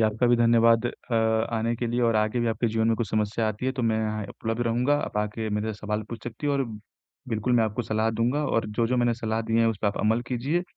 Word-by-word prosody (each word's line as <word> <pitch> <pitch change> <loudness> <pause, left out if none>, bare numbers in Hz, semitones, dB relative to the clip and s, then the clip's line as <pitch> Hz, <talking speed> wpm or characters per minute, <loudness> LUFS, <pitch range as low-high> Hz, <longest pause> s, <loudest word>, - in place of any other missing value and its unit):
आपका 110 +2 +2
भी 120 0 +4
धन्यवाद 115 0 +4
अ, 120 0 -6
आने 110 +1 +1
के 120 +1 -2
लिए 120 +1 -1
और 115 -2 +3
आगे 110 +3 +1
भी 120 - 0
आपके 115 +2 0
जीवन 110 0 0
में 115 - +2
कुछ 115 -5 -2
समस्या 110 +1 0
आती 110 +5 -4
है 130 - +1
तो 130 -2 -3
मैं 110 -1 +1
यहाँ 110 -1 -2
उपलब्ध 115 +1 -4
रहूँगा। 125 +5 +2
आप - - -7
आके 105 +1 -2
मेरे 105 +1 -1
से 105 - -11
सवाल 105 0 -2
पूछ 115 -2 -7
सकती 120 +5 -5
हो 145 - +2
और 135 -1 +1 0.6
बिल्कुल 115 +2 -1
मैं 115 -2 +4
आपको 110 +3 -2
सलाह 110 0 0
दूँगा 120 +7 0
और 115 - 0
जो-जो 115 +4 0
मैंने 120 -1 +2
सलाह 110 -1 -2
दी 115 +1 0
हैं, 115 - +4
उस 115 - 0
पर - - +2
आप 100 - -4
अमल 110 +2 +2
कीजिए, 135 +8 0
115 Hz, 260 wpm, -26 LUFS, 110-120 Hz, 0.6 s, भी